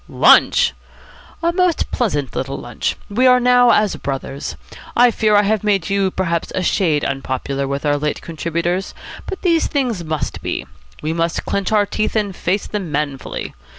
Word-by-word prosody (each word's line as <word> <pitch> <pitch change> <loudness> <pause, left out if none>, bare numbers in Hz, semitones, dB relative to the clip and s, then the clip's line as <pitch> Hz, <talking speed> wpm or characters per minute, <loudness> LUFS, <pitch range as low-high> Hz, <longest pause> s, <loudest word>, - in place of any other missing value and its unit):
"Lunch!" - - +5 0.7
"A 340 0 +2
most 360 -2 +1
pleasant 145 - -1
little 135 +1 -3
lunch. 120 - -3
We 245 +6 +2
are 250 0 +6
now 245 0 +5
as 210 -4 +3
brothers. 135 +1 -5 0.4
I 245 0 +6
fear 215 -1 +2
I 205 - +5
have 215 0 0
made 195 -4 +1
you 195 -1 +2
perhaps 170 -3 -2
a 185 - 0
shade 160 -5 +1
unpopular 135 0 -2
with 140 +2 -3
our 145 0 +2
late 150 0 -2
contributors; 170 +3 -3 0.3
but 385 - -6
these 335 -3 +3
things 245 - -1
must 155 -1 -3
be. - - -3 0.4
We 155 +1 -1
must 165 0 -1
clench 200 0 -1
our 210 -1 +4
teeth 215 +2 -2
and 205 -4 0
face 190 +4 -1
them 195 -6 -4
manfully. 140 -2 -3
185 Hz, 170 wpm, -19 LUFS, 150-220 Hz, 0.7 s, are